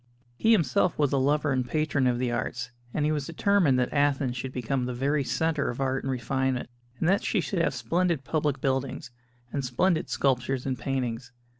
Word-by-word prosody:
He 220 - +2
himself 170 - +3
was 145 -2 +2
a 135 - +3
lover 145 +2 +2
and 130 -1 +1
patron 145 0 0
of 120 -1 +2
the 125 -1 -1
arts, 120 +1 -3 0.2
and 150 +2 0
he 155 - +2
was 145 -3 -2
determined 170 -5 +3
that 125 -1 0
Athens 140 -3 +1
should 130 +1 -4
become 125 +1 -1
the 125 0 -3
very 140 +3 +1
centre 160 +1 0
of 120 - -5
art 135 -1 0
and 135 - -3
refinement, 130 0 -1 0.3
and 160 - +1
that 195 +3 +3
she 210 - +1
should 180 +1 -2
have - - +1
splendid 170 -4 0
public 150 0 0
buildings 135 0 -2 0.4
and 140 - -1
splendid 160 +7 +1
sculptures 130 -1 0
and 130 -3 -2
paintings. 125 -2 -3
135 Hz, 195 wpm, -27 LUFS, 125-150 Hz, 0.4 s, himself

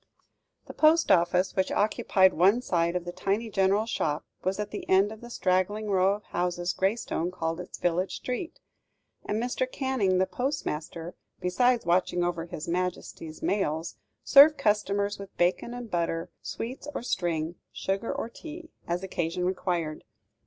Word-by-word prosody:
The - - -9
post 320 +1 +4
office, 180 +2 +3
which 190 - +1
occupied 190 -2 +3
one 200 +9 +4
side 170 -4 +1
of 180 -1 -2
the 175 - -4
tiny 210 +5 -2
general 195 +2 +2
shop, 155 -9 -1 0.2
was 190 +2 -1
at 210 0 -3
the 210 - -6
end 195 +2 +4
of 220 - -10
the 240 - -10
straggling 205 +1 0
row 190 +1 +3
of 210 - -11
houses 175 0 -1
Graystone 190 -3 0
called 165 -2 -3
its 180 - -7
village 175 +2 0
street; 290 +8 -5 0.7
and 210 - -1
Mr. 250 +2 -1
Canning, 250 -9 +1
the 185 - +3
postmaster, 175 - -3 0.3
besides 240 +7 +2
watching 175 0 +2
over 170 -1 -1
His 155 -2 -6
Majesty's 170 -2 -3
mails, 165 -5 -1 0.3
served 290 +2 +8
customers 205 -1 +1
with 200 -1 -10
bacon 180 +6 +1
and 240 -3 -7
butter, 165 -1 -1
sweets 255 +5 -6
or - - -3
string, 170 -7 -1 0.2
sugar 195 +4 -2
or - - -3
tea, 320 +7 -10 0.2
as 175 +2 -1
occasion 180 -1 -2
required. 175 -4 -2
190 Hz, 155 wpm, -28 LUFS, 175-220 Hz, 0.7 s, served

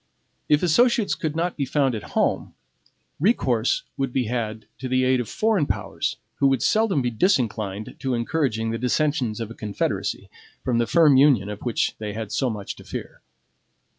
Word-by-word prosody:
If 150 +2 +4
associates 230 - +3
could 155 -2 -3
not 170 +2 -1
be 145 - -1
found 135 -1 +1
at 110 - -3 0.2
home, - - 0 0.6
recourse 130 - +2
would 135 -2 -1
be 125 0 0
had 110 -2 -3
to 130 - -4
the 130 0 +2
aid 130 0 +3
of 120 - -3
foreign 215 -9 +1
powers, - - -2 0.2
who 140 - +4
would 135 -2 +1
seldom 215 - +2
be 120 - 0
disinclined 110 - 0
to 130 -2 -1
encouraging 115 -3 -1
the 115 - -3
dissensions 125 -3 0
of 115 -1 -5
a - - -6
Confederacy, 105 -3 -3 0.4
from 120 -2 +1
the 120 - +1
firm 150 -1 +5
union 130 -8 +4
of 105 0 -6
which 120 -3 0
they 105 -1 -4
had 110 -1 -5
so 130 +3 0
much 105 -3 -5
to - - -12
fear. - - -7
125 Hz, 180 wpm, -24 LUFS, 110-150 Hz, 0.6 s, firm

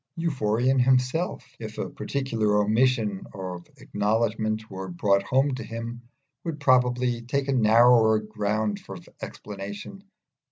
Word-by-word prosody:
Euphorion 130 -5 +1
himself, 130 +7 +1
if - - -7
a - - -2
particular 115 -7 -1
omission 110 -1 +1
of 90 -2 -6
acknowledgment 110 +1 -1
were 95 -2 -7
brought 100 +2 +2
home 135 +7 +1
to 130 - -4
him, 115 +1 -6 0.4
would 160 -3 -4
probably 125 -3 +2
take 135 +4 -2
a 140 - +1
narrower 115 -1 +5
ground 105 -1 -2
of 95 -3 -9
explanation. 100 - -8
115 Hz, 120 wpm, -26 LUFS, 105-130 Hz, 0.4 s, narrower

